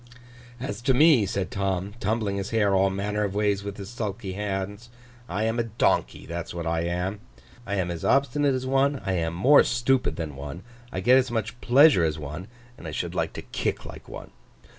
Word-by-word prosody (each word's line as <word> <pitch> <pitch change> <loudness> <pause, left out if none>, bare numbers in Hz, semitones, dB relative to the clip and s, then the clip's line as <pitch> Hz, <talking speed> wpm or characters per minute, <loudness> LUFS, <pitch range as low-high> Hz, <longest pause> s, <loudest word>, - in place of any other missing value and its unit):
'As 115 -3 -5
to 130 +1 +2
me,' 140 -7 +5
said 95 -3 -2
Tom, 95 0 -2
tumbling 105 -3 -1
his 100 0 -3
hair 105 -3 +2
all 95 0 +4
manner 105 +2 -2
of 100 -1 -3
ways 100 -1 +1
with 100 0 -6
his 100 +1 -8
sulky 105 -5 -4
hands, 100 +2 -4 0.4
'I 100 +4 -1
am 115 +2 0
a - - +2
Donkey, 115 0 0
that's 85 +1 -6
what 85 -1 -4
I 80 0 0
am. 90 +4 -2 0.5
I 100 - -1
am 90 -3 -1
as 85 -1 -6
obstinate 140 0 +2
as 130 0 -3
one, 135 +1 +2
I 95 - 0
am 85 -2 -1
more 130 +12 +6
stupid 125 +2 +1
than 80 -4 -5
one, 70 +5 -7 0.3
I 90 - -3
get 125 +6 +6
as 130 -1 -1
much 120 +1 -3
pleasure 135 - +6
as 80 -1 0
one, 75 +5 -7 0.3
and 80 - -8
I - - -5
should - - -3
like - - -1
to - - -7
kick - - -3
like - - -10
one. - - -9
100 Hz, 205 wpm, -26 LUFS, 90-120 Hz, 0.5 s, more